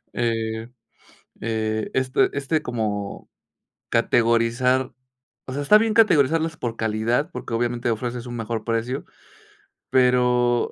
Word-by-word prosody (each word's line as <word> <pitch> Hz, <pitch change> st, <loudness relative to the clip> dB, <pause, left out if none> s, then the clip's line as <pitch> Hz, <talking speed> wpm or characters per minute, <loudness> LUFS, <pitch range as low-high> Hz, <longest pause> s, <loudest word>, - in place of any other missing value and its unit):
eh 115 Hz, -1 st, -2 dB, 0.7 s
eh 110 Hz, -1 st, -2 dB
este 130 Hz, 0 st, +2 dB
este 140 Hz, +3 st, -1 dB
como 105 Hz, -4 st, -4 dB, 0.6 s
categorizar 120 Hz, +3 st, +2 dB, 0.5 s
o 130 Hz, -, -6 dB
sea, 145 Hz, -, -2 dB
está 210 Hz, +9 st, +7 dB
bien 220 Hz, -1 st, 0 dB
categorizarlas 160 Hz, -5 st, +3 dB
por 115 Hz, -5 st, -4 dB
calidad, 115 Hz, +9 st, 0 dB
porque 115 Hz, -, -6 dB
obviamente 120 Hz, +1 st, -1 dB
ofreces 120 Hz, +2 st, -4 dB
un 120 Hz, -, -6 dB
mejor 115 Hz, 0 st, -3 dB
precio, 115 Hz, +3 st, -2 dB, 0.9 s
pero, 125 Hz, -1 st, +3 dB
120 Hz, 110 wpm, -23 LUFS, 115-130 Hz, 0.9 s, está